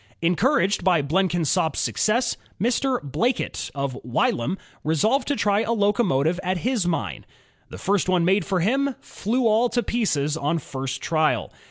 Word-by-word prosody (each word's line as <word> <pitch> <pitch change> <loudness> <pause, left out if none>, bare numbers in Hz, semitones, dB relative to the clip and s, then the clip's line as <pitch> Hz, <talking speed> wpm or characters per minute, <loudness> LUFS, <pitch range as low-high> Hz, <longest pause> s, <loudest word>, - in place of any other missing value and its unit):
Encouraged 195 - +2
by 175 -5 +3
Blenkinsop's 165 -2 +1
success, 235 +4 +1 0.2
Mr. 250 +4 +1
Blackett, 230 - -1
of 140 -2 -2
Wylam, 125 +6 0 0.3
resolved 215 - +1
to 285 - +1
try 205 -3 +2
a 230 - 0
locomotive 200 - +1
at 185 0 -1
his 240 -8 +1
mine. 105 - -2 0.5
The - - -9
first 195 -2 0
one 180 -2 +3
made 195 +3 +3
for 190 -3 -1
him 270 +7 +1
"flew 240 +4 -2
all 225 +2 +3
to 240 0 0
pieces" 155 -11 0
on 160 +1 0
first 135 -3 -5
trial. 155 -8 0
185 Hz, 150 wpm, -23 LUFS, 155-230 Hz, 0.5 s, by